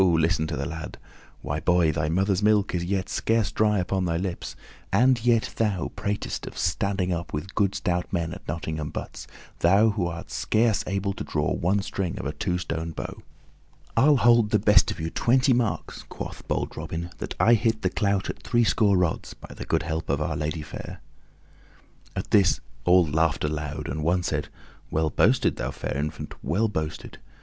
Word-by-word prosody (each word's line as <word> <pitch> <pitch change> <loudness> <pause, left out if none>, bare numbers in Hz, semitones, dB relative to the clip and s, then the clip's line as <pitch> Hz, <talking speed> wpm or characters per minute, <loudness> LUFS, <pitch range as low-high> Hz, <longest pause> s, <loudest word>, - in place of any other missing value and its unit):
listen 80 -2 +2
to 80 - -3
the 70 - -2
lad! 80 +1 -6 0.5
Why, 75 +1 -2
boy, 85 -1 +3
thy 75 0 -1
mother's 95 +3 +1
milk 105 -2 +3
is 85 -1 0
yet 95 +1 -1
scarce 115 -3 +1
dry 105 -1 +2
upon 95 0 0
thy 85 -1 0
lips, 90 0 -4 0.4
and 125 -1 +4
yet 120 -2 +2
thou 105 -6 0
pratest 100 0 -3
of - - -8
standing 95 +1 0
up 85 0 -5
with 75 +7 -4
good 100 -2 +1
stout 90 -1 -1
men 85 -2 -1
at 100 - -11
Nottingham 80 -2 -3
butts, - - -7 0.3
thou 100 +6 +5
who 100 -4 -1
art 85 -1 -7
scarce 110 -1 +1
able 100 +1 -1
to - - -5
draw - - -1
one 95 +3 +1
string 95 -3 -3
of - - -5
a 70 - -1
two 90 +5 -1
stone 80 -2 -4
bow." - - -6 0.7
"I'll 145 +1 +5
hold 120 -3 +5
the 105 - +4
best 105 0 +5
of - - -4
you 80 +1 -3
twenty 130 +2 +3
marks," 120 -3 -1
quoth - - -7
bold - - -2
Robin, 85 +1 -5
"that - - -5
I 120 - +6
hit 115 -1 +1
the - - +1
clout 100 -2 0
at - - -5
threescore 110 -4 +3
rods, 90 -3 -1
by - - -12
the - - -7
good 80 +1 +1
help 80 -1 -3
of 70 +1 +1
Our 75 +1 -1
Lady 75 +1 -3
fair." 75 - -8 1.2
At - - -4
this 95 -5 +4 0.3
all 90 0 +6
laughed 80 0 +1
aloud, 75 -1 -3
and 75 +3 -3
one 90 +3 +2
said, 75 -3 -1 0.4
"Well 80 0 0
boasted, - - +3
thou 60 - -2
fair 70 -1 -4
infant, 75 +2 -4
well 95 +11 +1
boasted! 80 -6 -5
90 Hz, 190 wpm, -26 LUFS, 80-105 Hz, 1.2 s, I